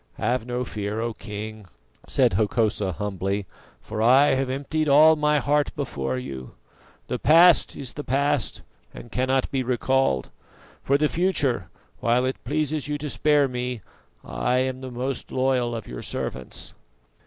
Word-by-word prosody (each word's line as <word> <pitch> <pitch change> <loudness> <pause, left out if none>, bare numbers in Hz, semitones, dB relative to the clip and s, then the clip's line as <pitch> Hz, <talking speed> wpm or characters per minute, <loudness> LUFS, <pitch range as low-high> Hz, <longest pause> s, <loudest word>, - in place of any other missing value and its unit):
"Have 120 +1 -1
no 125 +1 -2
fear, 105 0 -4
O 115 0 -2
King," 105 0 -7 0.4
said - - +2
Hokosa 105 -1 +1
humbly, 100 +1 -2 0.4
"for 110 0 -4
I 130 +5 +6
have 135 0 0
emptied 145 +3 -1
all 155 +3 +7
my 150 0 +2
heart 145 +1 +1
before 65 - -3
you. 65 0 -7 0.5
The - - -3
past 170 +2 +5
is 135 -3 -7
the 145 - -6
past, 140 -2 0 0.3
and 120 - -10
cannot 130 +1 0
be 135 - 0
recalled. 130 - +1 0.5
For 140 - +2
the 150 +1 +2
future, 145 - 0 0.3
while 120 +2 +2
it 130 - -3
pleases 150 +1 -1
you 150 0 -2
to 145 -1 -5
spare 145 +5 +3
me, 125 -3 -4 0.4
I - - 0
am 130 0 -1
the 130 - -6
most 125 +1 -4
loyal 130 -2 +1
of 115 - -6
your - - -7
servants." - - -5
125 Hz, 155 wpm, -24 LUFS, 110-140 Hz, 0.5 s, all